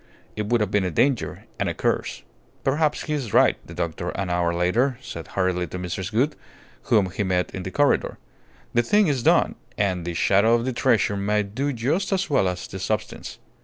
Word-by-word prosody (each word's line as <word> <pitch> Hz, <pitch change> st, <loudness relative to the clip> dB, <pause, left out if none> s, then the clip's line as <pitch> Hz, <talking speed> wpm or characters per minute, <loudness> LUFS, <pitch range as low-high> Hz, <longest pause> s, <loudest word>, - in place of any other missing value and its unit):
It 105 Hz, -1 st, -3 dB
would 120 Hz, 0 st, +2 dB
have 105 Hz, -2 st, 0 dB
been 105 Hz, -1 st, +2 dB
a 90 Hz, -, 0 dB
danger 125 Hz, -, 0 dB, 0.2 s
and -, -, 0 dB
a -, -, -4 dB
curse." -, -, -1 dB, 0.4 s
"Perhaps 150 Hz, +3 st, +1 dB
he 155 Hz, -, -3 dB
is 130 Hz, -8 st, -3 dB
right," -, -, +5 dB
the -, -, -10 dB
doctor, 80 Hz, -2 st, -3 dB
an 95 Hz, -2 st, -3 dB
hour 85 Hz, -1 st, +1 dB
later, 110 Hz, +10 st, +1 dB
said 85 Hz, -10 st, -8 dB
hurriedly 90 Hz, -2 st, 0 dB
to 90 Hz, -, -6 dB
Mrs. 90 Hz, +1 st, -4 dB
Gould, 130 Hz, +8 st, +1 dB, 0.5 s
whom 100 Hz, -5 st, +3 dB
he 100 Hz, -, -3 dB
met 90 Hz, -2 st, 0 dB
in 95 Hz, -, -4 dB
the 90 Hz, -, -5 dB
corridor. 145 Hz, +8 st, +1 dB, 0.6 s
"The 120 Hz, -, +4 dB
thing 205 Hz, -, +3 dB
is 140 Hz, -7 st, 0 dB
done, -, -, +3 dB, 0.2 s
and 95 Hz, -4 st, 0 dB
the 85 Hz, 0 st, -4 dB
shadow 100 Hz, +6 st, +4 dB
of 120 Hz, 0 st, -1 dB
the 130 Hz, -, -1 dB
treasure 110 Hz, -4 st, +2 dB
may 105 Hz, +1 st, +1 dB
do 130 Hz, +9 st, -2 dB
just 140 Hz, -, -1 dB
as 190 Hz, -4 st, 0 dB
well 100 Hz, -9 st, +3 dB
as 90 Hz, 0 st, -3 dB
the 95 Hz, -, -7 dB
substance. 95 Hz, +2 st, -3 dB
105 Hz, 205 wpm, -24 LUFS, 90-130 Hz, 0.6 s, right